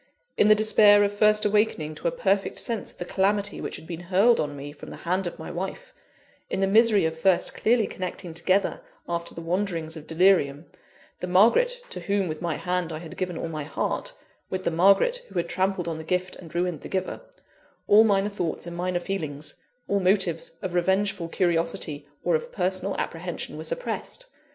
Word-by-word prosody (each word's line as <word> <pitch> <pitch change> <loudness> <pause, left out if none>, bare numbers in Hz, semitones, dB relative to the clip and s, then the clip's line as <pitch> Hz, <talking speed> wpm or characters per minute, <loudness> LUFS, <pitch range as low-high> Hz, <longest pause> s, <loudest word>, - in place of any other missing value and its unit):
In 210 - +4
the 215 - +7
despair 210 -1 +6
of 205 0 0
first 210 +1 +3
awakening 210 -7 +1
to 155 - -4
a - - +1
perfect 195 +2 0
sense 230 -3 -2
of - - -21
the 175 - -5
calamity 200 +2 0
which - - -4
had - - -10
been 165 -1 -6
hurled 205 +6 +5
on 145 -1 -2
me 145 +1 -7
from 145 - -11
the - - -8
hand 185 +2 0
of - - -6
my 160 - -7
wife 195 - -6 0.6
in - - -2
the 195 - +3
misery 210 -2 +5
of 160 0 -2
first 185 +1 +2
clearly 230 -1 +2
connecting 180 -2 -6
together, 185 +4 +1 0.3
after 170 0 -3
the 165 - -7
wanderings 170 -2 -2
of 155 -2 -10
delirium, 165 -4 +3 0.5
the 180 - -4
Margaret 235 - +4
to - - -5
whom 200 -2 0
with 155 0 -5
my 170 -3 -1
hand 180 0 -2
I 155 - -4
had 160 0 -9
given 180 -3 -3
all - - -3
my 155 -2 -4
heart, - - -3 0.4
with 185 0 -3
the - - 0
Margaret 195 - +4
who - - -15
had 170 0 0
trampled 190 -1 -1
on 160 -1 -3
the - - -6
gift 180 +2 -1
and 165 -2 -12
ruined 175 -3 -1
the - - -9
giver 190 -1 -3 0.7
all 210 +2 +7
minor 200 -2 +2
thoughts 175 -6 -3
and 170 0 -7
minor 180 0 -1
feelings, 155 -6 -4 0.3
all 200 - +1
motives 185 -3 +2
of 185 - -3
revengeful 190 0 +1
curiosity 165 -4 0 0.2
or - - +1
of 475 +1 -3
personal - - -1
apprehension - - -4
were - - -6
suppressed. - - -4
185 Hz, 200 wpm, -26 LUFS, 165-205 Hz, 0.7 s, the